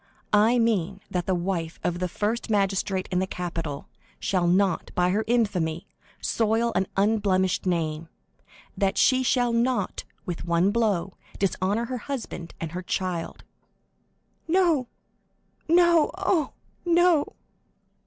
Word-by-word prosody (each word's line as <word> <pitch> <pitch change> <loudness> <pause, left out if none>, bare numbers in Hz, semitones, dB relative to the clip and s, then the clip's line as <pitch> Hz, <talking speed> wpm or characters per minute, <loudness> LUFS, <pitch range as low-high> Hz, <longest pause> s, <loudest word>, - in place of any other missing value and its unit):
"I 220 +4 +5
mean 200 -5 +1
that 180 -1 -2
the 190 - +2
wife 170 -2 -3
of 175 0 -1
the 180 - 0
first 215 +7 -2
magistrate 195 -2 0
in 180 - +1
the 190 - 0
capital 165 -6 -5 0.3
shall 180 -3 0
not, 185 0 +2
by 180 0 +2
her 210 +3 +1
infamy, 185 -9 0 0.3
soil 225 +1 +1
an 190 - +1
unblemished 195 -3 +1
name; 165 -2 -1 0.7
that 195 -2 0
she 260 -1 +4
shall 245 -2 +2
not, 240 +2 0 0.2
with 175 -4 -4
one 170 +3 +2
blow, 205 -5 0 0.2
dishonor 195 +3 0
her 250 +1 -4
husband 225 -10 -6
and 165 -2 -4
her 180 +2 -4
child." 180 -2 -3 1.0
"No, 330 -7 +2 0.8
no—oh, 340 -1 +3 0.3
no!" 345 -3 +3
195 Hz, 125 wpm, -25 LUFS, 180-235 Hz, 1.0 s, I